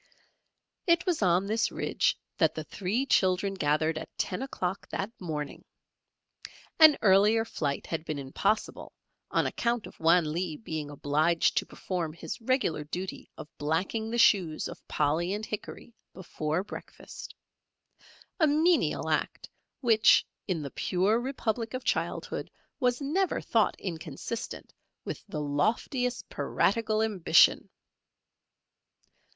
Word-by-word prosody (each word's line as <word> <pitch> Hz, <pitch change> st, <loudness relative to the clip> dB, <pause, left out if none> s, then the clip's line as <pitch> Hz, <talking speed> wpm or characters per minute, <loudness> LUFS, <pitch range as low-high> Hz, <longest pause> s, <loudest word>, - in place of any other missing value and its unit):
It 340 Hz, +1 st, +4 dB
was 355 Hz, -, 0 dB
on 180 Hz, 0 st, +3 dB
this 220 Hz, +3 st, 0 dB
ridge -, -, 0 dB, 0.2 s
that -, -, +3 dB
the -, -, -4 dB
three 210 Hz, +8 st, -2 dB
children 190 Hz, -4 st, +2 dB
gathered 155 Hz, -2 st, +1 dB
at 160 Hz, -, -8 dB
ten 185 Hz, -, -2 dB
o'clock 195 Hz, -8 st, -4 dB
that 195 Hz, +3 st, -3 dB
morning. 150 Hz, -4 st, -5 dB, 1.2 s
An 310 Hz, -2 st, +9 dB
earlier 210 Hz, +3 st, +5 dB
flight 140 Hz, -10 st, -3 dB
had 160 Hz, -1 st, -3 dB
been 155 Hz, -3 st, -4 dB
impossible 195 Hz, +10 st, -2 dB, 0.4 s
on -, -, +1 dB
account 235 Hz, -1 st, -1 dB
of -, -, -13 dB
Wan 165 Hz, -1 st, +4 dB
Lee 170 Hz, -2 st, -2 dB
being 155 Hz, -8 st, -5 dB
obliged 150 Hz, +4 st, +1 dB
to -, -, +1 dB
perform 170 Hz, -4 st, -4 dB
his 165 Hz, +6 st, -7 dB
regular 225 Hz, -, 0 dB
duty 180 Hz, +5 st, -6 dB
of 155 Hz, -, -8 dB
blacking 180 Hz, +9 st, -1 dB
the 235 Hz, -, -2 dB
shoes 190 Hz, -9 st, +3 dB
of -, -, -11 dB
Polly 160 Hz, +5 st, 0 dB
and 215 Hz, +1 st, -4 dB
Hickory 215 Hz, +2 st, -7 dB, 0.2 s
before 165 Hz, -2 st, -2 dB
breakfast, -, -, -10 dB, 1.0 s
a 315 Hz, -, +5 dB
menial 315 Hz, +4 st, +2 dB
act -, -, -1 dB, 0.3 s
which 225 Hz, -4 st, +5 dB, 0.2 s
in 170 Hz, -6 st, -1 dB
the 140 Hz, -, -6 dB
pure 195 Hz, +5 st, +1 dB
Republic 240 Hz, -2 st, -2 dB
of 255 Hz, -, -4 dB
childhood -, -, -2 dB, 0.3 s
was 250 Hz, 0 st, +1 dB
never 345 Hz, +7 st, 0 dB
thought 225 Hz, -2 st, +1 dB
inconsistent 170 Hz, -, -6 dB, 0.3 s
with -, -, -5 dB
the 155 Hz, -7 st, -4 dB
loftiest 235 Hz, -, -1 dB
piratical 220 Hz, +1 st, +1 dB
ambition. 205 Hz, -6 st, +4 dB
190 Hz, 125 wpm, -29 LUFS, 160-230 Hz, 1.2 s, An